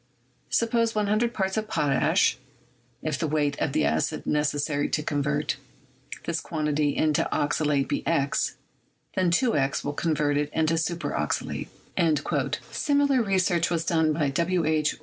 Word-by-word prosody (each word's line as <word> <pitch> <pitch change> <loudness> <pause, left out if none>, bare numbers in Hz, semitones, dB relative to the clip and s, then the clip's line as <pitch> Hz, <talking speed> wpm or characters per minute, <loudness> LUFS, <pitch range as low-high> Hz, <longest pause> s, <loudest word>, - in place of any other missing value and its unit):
Suppose 230 -1 +1
100 215 +3 +1
parts 190 -3 -1
of 215 0 -1
potash; 145 -9 +2 0.6
if 155 -3 -2
the 160 - 0
weight 145 -1 +1
of 140 - 0
acid 80 +1 0
neces 150 -1 +1
sary 145 -1 -1
to 150 - -1
convert 145 0 -1 0.7
this 165 -1 -1
quantity 150 -2 -1
into 155 -1 +2
oxalate 145 -1 +1
be - - -1
x, 140 -4 +1 0.6
then 185 -2 +2
2x 170 - +1
will 145 - -1
convert 150 -2 0
it 145 0 0
into 160 +1 +2
super 170 +1 -2
oxalate." 75 - -2 1.0
Similar 285 -3 +2
research 185 -5 +1
was 165 -1 -1
done 160 -2 +2
by 150 -2 +1
W. 170 +3 +1
H. 155 -1 +1
155 Hz, 140 wpm, -26 LUFS, 145-185 Hz, 1.0 s, potash